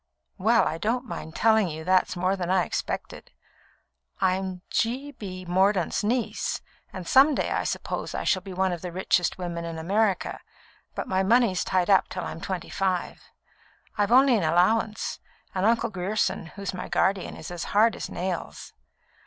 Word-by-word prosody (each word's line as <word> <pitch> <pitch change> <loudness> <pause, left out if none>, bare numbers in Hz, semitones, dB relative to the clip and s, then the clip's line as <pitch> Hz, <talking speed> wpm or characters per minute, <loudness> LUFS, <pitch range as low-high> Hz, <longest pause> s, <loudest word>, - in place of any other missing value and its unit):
"Well, 225 +4 +4
I 160 - -3
don't 240 +7 -1
mind 160 -8 -7
telling 220 -4 +3
you 160 0 -6
that's 185 +2 +2
more 185 +2 +1
than 180 -2 -4
I 185 -1 +3
expected. - - -4 0.9
I'm 185 -1 0
G. 260 +5 -1
B. 185 -7 -8
Mordaunt's 190 +1 +2
niece, 235 +3 -1 0.3
and 185 -2 -7
some 275 +3 +6
day - - -1
I - - 0
suppose - - -3
I - - -2
shall 185 - +2
be 190 +1 -9
one 190 0 0
of 175 -2 -4
the 180 - -5
richest 180 -1 +1
women 170 -2 -4
in 165 -1 -5
America, 195 +4 0 0.6
but - - -4
my 190 0 +1
money's 215 -2 +3
tied 185 +1 +1
up 190 - +5
till 180 - -4
I'm 165 - -6
twenty 185 -3 -4
five. 190 -3 -1 0.7
I've 205 +1 +1
only 260 0 +6
an 205 - +1
allowance, 200 +7 +1 0.3
and 190 +2 +1
Uncle 230 0 +2
Grierson, 190 -2 -1
who 200 +5 -10
is 195 - -3
my 185 - -6
guardian, 190 -1 +1
is 175 +2 -6
hard 220 +2 +3
as - - -6
nails. 175 - -5
190 Hz, 170 wpm, -26 LUFS, 180-215 Hz, 0.9 s, some